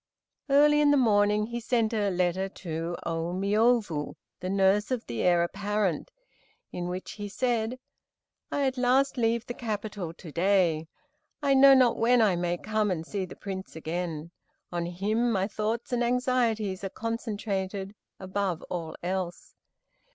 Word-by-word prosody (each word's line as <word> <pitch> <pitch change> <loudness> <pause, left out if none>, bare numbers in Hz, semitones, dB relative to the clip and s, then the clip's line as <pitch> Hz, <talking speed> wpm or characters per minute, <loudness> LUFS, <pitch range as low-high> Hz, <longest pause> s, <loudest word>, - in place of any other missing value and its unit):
Early 295 +2 +5
in 295 - +5
the 290 - +5
morning 210 -3 +3
he 235 +2 -4
sent 230 -1 0
a 205 -2 +1
letter 185 +1 0
to 170 -2 -5
Ô 165 +1 -2
Miôbu, 205 - +1 0.2
the 185 - -4
nurse 195 +2 +3
of 255 -3 -2
the 115 -2 -4
Heir 175 -1 +4
apparent, 200 -1 -1 0.6
in 175 0 -4
which 180 +1 -5
he 205 -1 -6
said: 240 +1 -1 0.7
"I 285 - +1
at 260 -1 -1
last 260 +3 +3
leave 235 -1 +1
the 240 - -5
capital, 210 -6 -4
to 165 -1 -11
day. 170 -2 +2 0.6
I 280 -1 +4
know 270 0 +8
not 255 -3 +4
when 245 +2 +4
I 210 -5 +4
may 175 0 -1
come 215 +2 0
and 165 -3 -2
see 195 +1 -3
the 180 - -11
Prince 190 -3 -7
again. 160 0 -4 0.4
On 170 -1 -2
him 215 +7 0
my 195 -2 +1
thoughts 220 +3 -3
and 245 0 +2
anxieties 235 -5 0
are 195 - -2
concentrated, 205 -3 -3 0.3
above 190 -2 -2
all 165 -3 -4
else. 180 -1 -3
205 Hz, 155 wpm, -28 LUFS, 180-235 Hz, 0.7 s, know